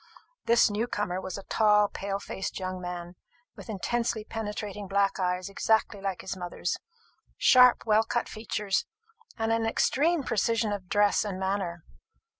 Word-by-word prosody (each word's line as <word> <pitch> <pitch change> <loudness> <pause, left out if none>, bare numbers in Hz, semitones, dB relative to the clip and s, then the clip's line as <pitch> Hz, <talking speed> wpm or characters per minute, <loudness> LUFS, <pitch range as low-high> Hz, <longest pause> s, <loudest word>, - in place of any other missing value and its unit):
This 235 -1 +5
new 215 +4 -1
comer 195 -5 -2
was 185 0 -5
a 195 - -8
tall 210 -1 +4
pale 195 0 -4
faced 195 -1 -5
young 185 -1 -4
man, 175 -1 -6 0.4
with - - -11
intensely 230 +2 -1
penetrating 210 -2 -5
black 200 +1 +1
eyes 180 0 -1
exactly 205 0 +1
like 195 -2 -3
his 190 - -5
mother's, 175 -1 -3 0.6
sharp 250 -1 +6
well 215 -1 +4
cut 240 +1 -1
features, 210 -3 -2 0.5
and 225 0 0
an 225 0 +1
extreme 295 +7 +2
precision 230 -2 +1
of 185 -3 -6
dress 205 -1 +3
and 200 -3 -4
manner. 190 -3 -2
205 Hz, 150 wpm, -28 LUFS, 190-225 Hz, 0.6 s, sharp